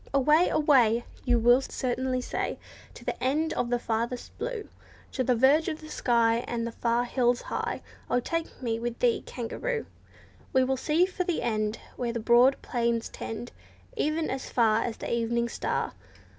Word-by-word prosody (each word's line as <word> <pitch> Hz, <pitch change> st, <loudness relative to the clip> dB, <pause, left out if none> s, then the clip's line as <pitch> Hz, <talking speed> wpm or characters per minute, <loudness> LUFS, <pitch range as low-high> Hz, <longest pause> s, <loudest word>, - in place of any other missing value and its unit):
"Away 300 Hz, +6 st, +5 dB
and -, -, -2 dB
away!" 240 Hz, -6 st, +4 dB, 0.2 s
You 245 Hz, -1 st, +3 dB
will 240 Hz, +3 st, +5 dB
certainly 255 Hz, 0 st, -2 dB
say, -, -, -3 dB, 0.4 s
"To -, -, -12 dB
the -, -, -3 dB
end 305 Hz, +5 st, +1 dB
of 240 Hz, -, -1 dB
the 245 Hz, -, +2 dB
furthest 235 Hz, +1 st, -3 dB
blue— 480 Hz, -4 st, -4 dB, 0.4 s
To 260 Hz, -, -1 dB
the 250 Hz, 0 st, +2 dB
verge 275 Hz, +7 st, +4 dB
of 315 Hz, -3 st, -2 dB
the 310 Hz, -, -11 dB
sky, 230 Hz, -2 st, +3 dB
And 230 Hz, -1 st, -2 dB
the 235 Hz, -, -3 dB
far 235 Hz, +1 st, +1 dB
hills 245 Hz, -1 st, +2 dB
high, -, -, -3 dB, 0.3 s
O 245 Hz, -, +3 dB
take 330 Hz, +1 st, -4 dB
me 225 Hz, -2 st, -1 dB
with 240 Hz, 0 st, -3 dB
thee, 240 Hz, -2 st, +2 dB
kangaroo! 450 Hz, -, -3 dB, 0.7 s
We 260 Hz, -1 st, +5 dB
will 265 Hz, +1 st, +1 dB
seek 335 Hz, +8 st, +2 dB
for 365 Hz, -, -1 dB
the 350 Hz, -2 st, -1 dB
end, 215 Hz, -1 st, 0 dB, 0.2 s
Where 235 Hz, -1 st, -2 dB
the 235 Hz, -, -2 dB
broad 240 Hz, +4 st, +5 dB
plains 235 Hz, -2 st, 0 dB
tend, 230 Hz, +2 st, -6 dB, 0.4 s
E'en 310 Hz, +2 st, 0 dB
as 265 Hz, 0 st, -4 dB
far 225 Hz, -2 st, +3 dB
as 235 Hz, -, -3 dB
the -, -, -4 dB
evening 235 Hz, 0 st, 0 dB
star. -, -, -2 dB
245 Hz, 180 wpm, -28 LUFS, 235-280 Hz, 0.7 s, Away